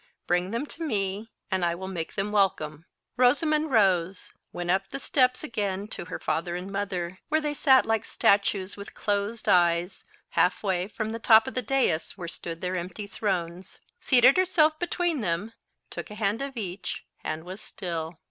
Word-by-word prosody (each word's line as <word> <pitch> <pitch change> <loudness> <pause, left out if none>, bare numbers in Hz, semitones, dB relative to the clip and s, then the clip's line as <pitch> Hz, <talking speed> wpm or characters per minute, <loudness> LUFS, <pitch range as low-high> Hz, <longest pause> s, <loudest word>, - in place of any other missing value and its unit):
Bring 180 +1 +1
them 235 +7 -2
to 325 +2 -7
me, 205 -5 -2 0.2
and 190 -1 +1
I 170 -1 +1
will 190 +2 -6
make 175 -4 -5
them 200 +1 -1
welcome." 165 -6 0 0.3
Rosamond 305 +5 +3
rose, 190 -6 +2 0.2
went 175 0 -2
up 195 +1 0
the 275 - -5
steps 255 -1 +2
again 205 -7 -2
to - - -6
her 180 - -5
father 175 +2 -2
and 180 +2 -5
mother, 185 -3 -3
where 315 - +3
they 300 -1 -2
sat 265 -3 +5
like 225 -1 +1
statues 200 -2 +1
with 200 0 -10
closed 205 +2 -1
eyes, 175 +1 +3 0.3
half 180 - +2
way 185 -2 0
from 220 +1 -4
the 230 - -4
top 220 0 +6
of 265 - -4
the 255 - 0
dais 245 -12 0
where 175 -3 -6
stood 165 0 -6
their 185 0 -2
empty 180 +3 -5
thrones, 185 -3 -3 0.2
seated 255 +2 +6
herself 315 -4 +3
between 350 -4 0
them, 185 +3 -2 0.4
took - - -6
a 210 - -8
hand 210 +2 0
of 275 -2 -5
each, 185 -3 -5 0.2
and 155 +1 -3
was 185 +4 -8
still. 170 -5 -5
200 Hz, 180 wpm, -27 LUFS, 180-235 Hz, 0.4 s, top